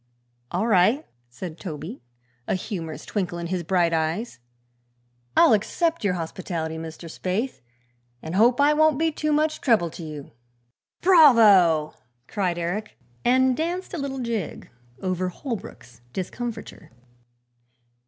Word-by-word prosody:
"All 185 Hz, +5 st, -1 dB
right," 225 Hz, -, +3 dB, 0.2 s
said 160 Hz, +6 st, -8 dB
Toby, 170 Hz, -, -7 dB, 0.5 s
a -, -, +1 dB
humorous 165 Hz, -, -5 dB
twinkle 185 Hz, -4 st, -2 dB
in 170 Hz, -, -4 dB
his 180 Hz, +1 st, -2 dB
bright 170 Hz, 0 st, +1 dB
eyes; 165 Hz, -, -1 dB, 1.0 s
"I'll -, -, +7 dB
accept 325 Hz, -, 0 dB
your 190 Hz, -3 st, +1 dB
hospitality, 165 Hz, -1 st, -4 dB
Mr. 165 Hz, +1 st, -8 dB
Spaythe, 190 Hz, +10 st, -3 dB, 0.6 s
and 160 Hz, +6 st, -7 dB
hope 235 Hz, +6 st, +4 dB
I 290 Hz, +1 st, +5 dB
won't 310 Hz, -1 st, +4 dB
be 325 Hz, +1 st, +1 dB
too 305 Hz, 0 st, -2 dB
much 305 Hz, +1 st, +1 dB
trouble 210 Hz, -, +2 dB
to 170 Hz, -, -9 dB
you." 150 Hz, -3 st, -8 dB, 0.7 s
"Bravo!" 215 Hz, -, +6 dB, 0.3 s
cried 185 Hz, -5 st, -1 dB
Eric, 180 Hz, +5 st, -4 dB, 0.3 s
and 255 Hz, +1 st, +4 dB
danced 350 Hz, +5 st, -3 dB
a 340 Hz, -, -3 dB
little 275 Hz, -1 st, -3 dB
jig 235 Hz, -8 st, -4 dB, 0.3 s
over 185 Hz, -1 st, -1 dB
Holbrook's 195 Hz, -, -8 dB
discomfiture. 225 Hz, -, -6 dB
195 Hz, 125 wpm, -24 LUFS, 170-255 Hz, 1.0 s, I'll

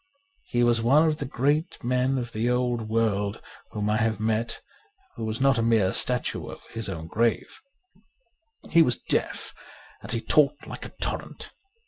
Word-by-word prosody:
He 120 Hz, 0 st, +1 dB
was 120 Hz, -1 st, +3 dB
the 115 Hz, -, -1 dB
one 155 Hz, +5 st, +5 dB
great 145 Hz, +4 st, -1 dB
man 125 Hz, +2 st, +1 dB
of 120 Hz, -2 st, -4 dB
the 115 Hz, +2 st, -1 dB
old 120 Hz, -3 st, 0 dB
world 105 Hz, -3 st, 0 dB, 0.3 s
whom 105 Hz, 0 st, -3 dB
I 105 Hz, +1 st, +2 dB
have 115 Hz, -1 st, 0 dB
met 110 Hz, +1 st, -1 dB, 0.6 s
who -, -, -6 dB
was 110 Hz, 0 st, -3 dB
not 135 Hz, -2 st, +3 dB
a -, -, +2 dB
mere 110 Hz, -5 st, +3 dB
statue 125 Hz, -1 st, 0 dB
over -, -, -9 dB
his 115 Hz, -3 st, -5 dB
own 80 Hz, -4 st, -5 dB
grave. 115 Hz, +7 st, -1 dB, 1.1 s
He 170 Hz, -, +7 dB
was 125 Hz, -7 st, +2 dB
deaf -, -, -2 dB, 0.5 s
and -, -, -6 dB
he 115 Hz, -, +1 dB
talked 145 Hz, +4 st, +2 dB
like -, -, -7 dB
a -, -, -18 dB
torrent. -, -, -4 dB
115 Hz, 165 wpm, -26 LUFS, 110-125 Hz, 1.1 s, He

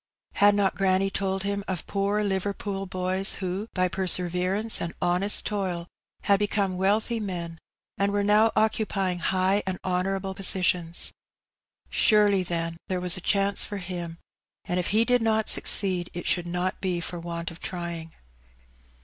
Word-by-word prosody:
Had 205 Hz, 0 st, +4 dB
not 200 Hz, -2 st, +2 dB
granny 195 Hz, 0 st, +1 dB
told 195 Hz, -1 st, -2 dB
him 200 Hz, 0 st, -2 dB
of 180 Hz, -4 st, -4 dB
poor 200 Hz, +1 st, 0 dB
Liverpool 195 Hz, 0 st, -3 dB
boys 185 Hz, +1 st, +1 dB
who, 190 Hz, +3 st, -4 dB
by 185 Hz, -1 st, +2 dB
perseverance 185 Hz, +3 st, +2 dB
and 170 Hz, -, -4 dB
honest 180 Hz, +4 st, +2 dB
toil, 185 Hz, -5 st, -2 dB, 0.4 s
had 200 Hz, -1 st, +3 dB
become 200 Hz, -2 st, 0 dB
wealthy 210 Hz, +5 st, +1 dB
men, 170 Hz, -5 st, -5 dB, 0.4 s
and 200 Hz, 0 st, +1 dB
were 205 Hz, 0 st, 0 dB
now 210 Hz, +2 st, +4 dB
occupying 200 Hz, -4 st, 0 dB
high 190 Hz, +3 st, +1 dB
and 185 Hz, -1 st, -2 dB
honourable 190 Hz, +1 st, -1 dB
positions? 180 Hz, -3 st, +1 dB, 0.8 s
Surely, 205 Hz, -3 st, +4 dB
then, 165 Hz, -2 st, -3 dB
there 185 Hz, -1 st, -2 dB
was 180 Hz, -1 st, +1 dB
a 185 Hz, -, -4 dB
chance 200 Hz, +1 st, +1 dB
for 205 Hz, -, -5 dB
him, 175 Hz, -3 st, -6 dB, 0.5 s
and 180 Hz, -, -1 dB
if 180 Hz, -, -1 dB
he 220 Hz, +2 st, +2 dB
did 245 Hz, 0 st, +2 dB
not 220 Hz, -1 st, +1 dB
succeed 185 Hz, -3 st, +4 dB
it 175 Hz, -, -5 dB
should 175 Hz, -1 st, 0 dB
not 180 Hz, +2 st, -2 dB
be 180 Hz, -2 st, -1 dB
for 170 Hz, +1 st, -5 dB
want 170 Hz, 0 st, -5 dB
of 165 Hz, -, -12 dB
trying. 170 Hz, -2 st, -5 dB
190 Hz, 155 wpm, -26 LUFS, 180-200 Hz, 0.8 s, Had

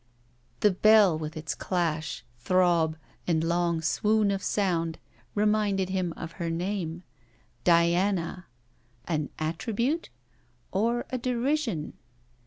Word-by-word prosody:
The 210 Hz, -, +5 dB
Bell, 210 Hz, -2 st, +6 dB
with 155 Hz, +1 st, -5 dB
its 155 Hz, -1 st, -3 dB
clash, 165 Hz, -4 st, -2 dB, 0.2 s
throb 170 Hz, 0 st, +2 dB, 0.3 s
and 160 Hz, -2 st, +2 dB
long 170 Hz, -1 st, +1 dB
swoon 210 Hz, +4 st, +2 dB
of 195 Hz, -1 st, -1 dB
sound, 170 Hz, -6 st, 0 dB, 0.4 s
reminded 205 Hz, -2 st, +2 dB
him 185 Hz, -2 st, -1 dB
of 165 Hz, -, -6 dB
her 170 Hz, -, -1 dB
name: 175 Hz, 0 st, -3 dB, 0.6 s
Diana! 175 Hz, +1 st, +2 dB, 0.6 s
An 155 Hz, -4 st, -1 dB
attribute? 225 Hz, -, -1 dB, 0.6 s
or 235 Hz, +5 st, 0 dB
a 255 Hz, -, -1 dB
derision? 245 Hz, -, -1 dB
180 Hz, 105 wpm, -28 LUFS, 165-210 Hz, 0.6 s, Bell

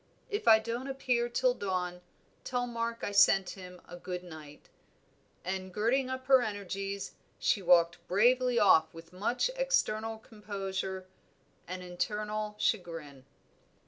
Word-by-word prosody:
If 410 Hz, -11 st, -3 dB
I 220 Hz, -1 st, +9 dB
don't 235 Hz, +4 st, -4 dB
appear 250 Hz, -3 st, 0 dB
till 255 Hz, +1 st, +2 dB
dawn, 180 Hz, -5 st, -3 dB, 0.4 s
tell 245 Hz, -1 st, -1 dB
Mark 230 Hz, -1 st, -3 dB
I -, -, -2 dB
sent 195 Hz, -2 st, +5 dB
him 180 Hz, -2 st, -10 dB
a 175 Hz, -, -9 dB
good 180 Hz, 0 st, -6 dB
night," 155 Hz, -4 st, -12 dB, 0.8 s
and 185 Hz, 0 st, -3 dB
girding 245 Hz, +7 st, +1 dB
up 260 Hz, 0 st, -5 dB
her 265 Hz, -1 st, +6 dB
energies 200 Hz, -2 st, -4 dB, 0.2 s
she 205 Hz, -, +1 dB
walked 170 Hz, -1 st, +3 dB
bravely 245 Hz, +5 st, +3 dB
off 160 Hz, -7 st, +5 dB
with 165 Hz, +1 st, -12 dB
much 240 Hz, -, 0 dB
external 225 Hz, -, 0 dB
composure 195 Hz, -4 st, -5 dB, 0.6 s
and 185 Hz, 0 st, -6 dB
internal 210 Hz, +3 st, -3 dB
chagrin. 165 Hz, -, -2 dB
205 Hz, 130 wpm, -31 LUFS, 180-235 Hz, 0.8 s, I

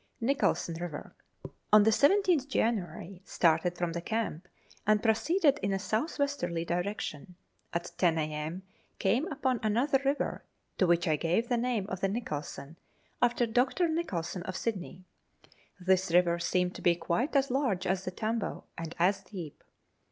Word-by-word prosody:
Nicholson 240 Hz, -8 st, +1 dB
River. 165 Hz, -4 st, -6 dB, 0.6 s
On 210 Hz, 0 st, +8 dB
the 220 Hz, -, +4 dB
17th 330 Hz, -, +3 dB
January, 190 Hz, -, -2 dB
started 175 Hz, +1 st, +2 dB
from 175 Hz, -1 st, -1 dB
the 170 Hz, -, -3 dB
camp, 205 Hz, -4 st, -3 dB, 0.4 s
and 215 Hz, 0 st, +3 dB
proceeded 280 Hz, -, +3 dB
in 200 Hz, -, 0 dB
a -, -, +1 dB
south 220 Hz, -, -2 dB
westerly 260 Hz, -, -1 dB
direction. 175 Hz, -2 st, -3 dB, 0.4 s
At 170 Hz, 0 st, -3 dB
ten 170 Hz, -3 st, +3 dB
a.m. 155 Hz, +3 st, -3 dB, 0.3 s
came 235 Hz, -, +1 dB
upon 260 Hz, -4 st, 0 dB
another 250 Hz, +6 st, +2 dB
river, 275 Hz, +1 st, -1 dB, 0.4 s
to 185 Hz, -, +4 dB
which 170 Hz, 0 st, +3 dB
I 155 Hz, -1 st, +2 dB
gave 175 Hz, +10 st, 0 dB
the 245 Hz, -, +2 dB
name 235 Hz, -4 st, 0 dB
of 190 Hz, -2 st, -4 dB
the 195 Hz, -, +2 dB
Nicholson, 155 Hz, -, -5 dB, 0.4 s
after 240 Hz, 0 st, +3 dB
Dr. 250 Hz, +10 st, +2 dB
Nicholson, 200 Hz, -, -2 dB
of 185 Hz, +1 st, -5 dB
Sydney. 185 Hz, -4 st, -4 dB, 0.8 s
This 185 Hz, 0 st, +2 dB
river 170 Hz, 0 st, +4 dB
seemed 180 Hz, +1 st, 0 dB
to -, -, -10 dB
be 175 Hz, -1 st, +4 dB
quite 235 Hz, -, -1 dB
as 275 Hz, -1 st, +3 dB
large 245 Hz, -9 st, 0 dB
as 190 Hz, 0 st, 0 dB
the 185 Hz, -, -3 dB
Tambo, 220 Hz, +3 st, -3 dB
and 165 Hz, 0 st, -6 dB
as 190 Hz, +3 st, +2 dB
deep. 175 Hz, -8 st, -9 dB
195 Hz, 155 wpm, -30 LUFS, 175-245 Hz, 0.8 s, On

